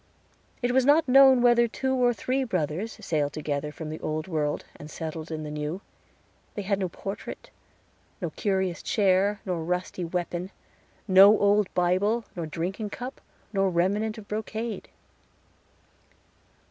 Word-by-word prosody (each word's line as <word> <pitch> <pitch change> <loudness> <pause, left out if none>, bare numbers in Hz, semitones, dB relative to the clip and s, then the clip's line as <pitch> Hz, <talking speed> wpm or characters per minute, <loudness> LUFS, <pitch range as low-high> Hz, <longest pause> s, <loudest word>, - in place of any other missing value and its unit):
It 245 - +2
was 260 +1 +4
not 290 +4 +4
known 265 -1 +7
whether 240 -1 +5
two 265 +3 -2
or 250 -2 +3
three 255 +4 -1
brothers 185 - -2
sailed 150 -3 0
together 150 -1 -3
from 155 0 -7
the 155 - -6
Old 155 +1 -3
World 150 -4 -1
and 150 - -10
settled 160 0 -6
in 155 -1 -4
the 150 - -6
New. 150 +4 -3 0.8
They 205 - -3
had 200 0 0
no 185 -2 -1
portrait, 195 +4 -7 0.7
nor - - -3
curious 190 -4 -1
chair, 200 0 +2
nor 175 -4 -2
rusty 180 +1 -2
weapon 175 +1 -3 0.6
no 200 +2 +8
old 205 -1 +3
Bible, 195 +6 +1
nor 170 -3 -4
drinking 185 +7 -4
cup, 250 +5 -7 0.3
nor 195 -1 +2
remnant 200 +6 0
of 210 -2 -10
brocade. 220 +1 -4
190 Hz, 145 wpm, -26 LUFS, 165-220 Hz, 0.8 s, no